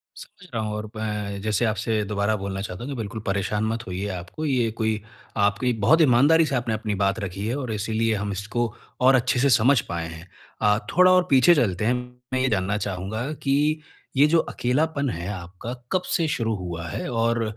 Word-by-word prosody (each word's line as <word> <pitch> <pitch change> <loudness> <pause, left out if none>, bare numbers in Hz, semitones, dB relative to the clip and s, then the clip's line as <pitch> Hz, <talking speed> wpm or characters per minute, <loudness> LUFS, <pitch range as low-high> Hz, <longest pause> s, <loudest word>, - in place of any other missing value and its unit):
समझ - - -13
रहा 115 - -1
हूँ 105 0 -3
और 105 0 -5
मैं, 105 -2 -3
जैसे 110 +2 +1
आपसे 110 0 0
दोबारा 100 +1 0
बोलना 95 0 -4
चाहता 95 +2 -6
हूँ 140 - -5
कि - - -4
बिल्कुल 110 0 -5
परेशान 100 +2 -1
मत 115 +2 -2
होइए 95 +2 -3
आपको, 95 - -5
ये 125 -5 +1
कोई 110 -1 -1 0.4
आपकी 105 +5 +2
बहुत 115 +10 +4
ईमानदारी 150 +4 +5
से 140 - -1
आपने 120 -2 -1
अपनी 110 -1 -2
बात 100 +1 +1
रखी 100 0 -4
है 120 - -1
और 130 -5 -4
इसीलिए 110 +1 0
हम 100 0 -3
इसको 105 +4 -2 0.3
और 130 +1 +6
अच्छे 125 +1 +2
से 140 +2 +3
समझ 125 +3 +5
पाएँ 85 -1 -3
हैं। 80 +2 -10 0.3
अ, 105 0 +4 0.2
थोड़ा 185 +1 +7
और 185 0 +5
पीछे 135 +6 +6
चलते 105 - +1
हैं, 120 - +3 0.4
मैं 130 - +2
ये 130 - +2
जानना 100 -1 0
चाहूँगा 105 +6 -3
कि 150 +3 +2 0.4
ये 140 - +7
जो 165 +2 +4
अकेलापन 140 +2 0
है 85 -4 -4
आपका 95 +5 -7 0.2
कब 185 - +2
से 165 -3 +1
शुरू 115 -6 -1
हुआ 85 -3 -5
है? - - -4
और 115 0 +1
110 Hz, 205 wpm, -24 LUFS, 100-130 Hz, 0.4 s, थोड़ा